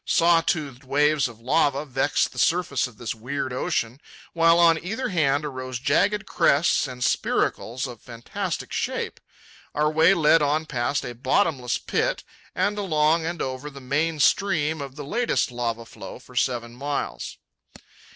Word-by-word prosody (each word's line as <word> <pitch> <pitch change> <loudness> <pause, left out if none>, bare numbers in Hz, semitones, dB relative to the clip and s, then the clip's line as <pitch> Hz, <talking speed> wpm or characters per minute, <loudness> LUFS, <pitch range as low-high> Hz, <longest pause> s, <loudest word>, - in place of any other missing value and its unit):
Saw 170 0 +4
toothed 145 -6 -2
waves 145 +1 +2
of 115 -2 -12
lava 140 +3 +1
vexed 135 +1 0
the - - -7
surface 165 -6 +1
of 120 -4 -16
this 115 -2 -4
weird 130 +3 -4
ocean, 125 +1 -2 0.3
while 165 0 +5
on 165 -2 +4
either 220 +8 -3
hand 150 -5 +1
arose 130 -3 -5
jagged 155 +10 +1
crests 145 +1 +2
and 125 -1 -6
spiracles 125 +1 0
of 120 -4 -8
fantastic 120 -1 -5
shape. - - -3 0.6
Our 150 +1 +2
way 160 +5 +5
led 165 -1 +4
on 150 +2 +1
past 125 +2 -1
a 120 - -5
bottomless 130 - +1
pit - - -1 0.3
and 205 0 0
along 160 -3 +2
and 170 -1 -3
over 130 +2 -5
the 140 -1 -11
main 150 +4 -1
stream 160 -1 +2
of 135 -1 -7
the 145 -1 -7
latest 235 - 0
lava 115 -1 -3
flow - - -10
for 125 - -17
seven 120 -1 -1
miles. 145 +3 -4
145 Hz, 155 wpm, -24 LUFS, 125-165 Hz, 0.6 s, while